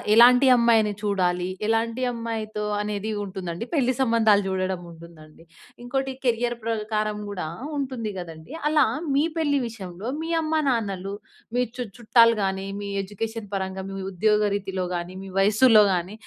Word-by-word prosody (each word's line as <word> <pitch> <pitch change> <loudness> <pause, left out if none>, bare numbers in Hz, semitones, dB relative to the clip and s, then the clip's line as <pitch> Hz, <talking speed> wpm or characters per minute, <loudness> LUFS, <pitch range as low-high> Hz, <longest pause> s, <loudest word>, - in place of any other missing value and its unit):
ఎలాంటి 250 +3 +7
అమ్మాయిని 225 -3 +4
చూడాలి? 180 -3 0 0.2
ఎలాంటి 230 +2 0
అమ్మాయితో 220 -2 -4 0.2
అనేది 210 +1 -3
ఉంటుందండి. 185 +1 -5
పెళ్లి 255 -3 +2
సంబంధాలు 220 -4 +4
చూడడం 185 -1 -1
ఉంటుం‌దండి. 165 -1 -15 0.4
ఇంకోటి 270 +1 -1 0.2
కెరియర్ 240 0 +1
ప్రకారం 215 -1 -1
కూడా 185 -6 -4 0.3
ఉంటుంది 255 -5 -3
కదండీ! 165 - -9 0.2
అలా 300 -3 +4 0.3
మీ 285 - +4 0.2
పెళ్లి 290 -3 +2
విషయంలో, 195 -2 -8
మీ 325 - -4
అమ్మ 315 0 -2 0.2
నాన్నలు 200 -5 -2 0.4
మీ 250 - +3 0.2
చు 250 - -3 0.2
చుట్టాలు 230 0 +5
గాని, 190 0 -2
మీ 200 - -5 0.2
ఎడ్యుకేషన్ 215 +2 -5
పరంగా, 190 0 -3
మీ 195 - -6 0.2
ఉద్యోగ 210 +3 +2 0.2
రీతిలో 190 -2 -3
గాని, 175 0 -3
మీ 195 - -8
వయస్సులో 215 +3 +6
గాని 180 +2 -2
210 Hz, 140 wpm, -24 LUFS, 190-235 Hz, 0.4 s, ఎలాంటి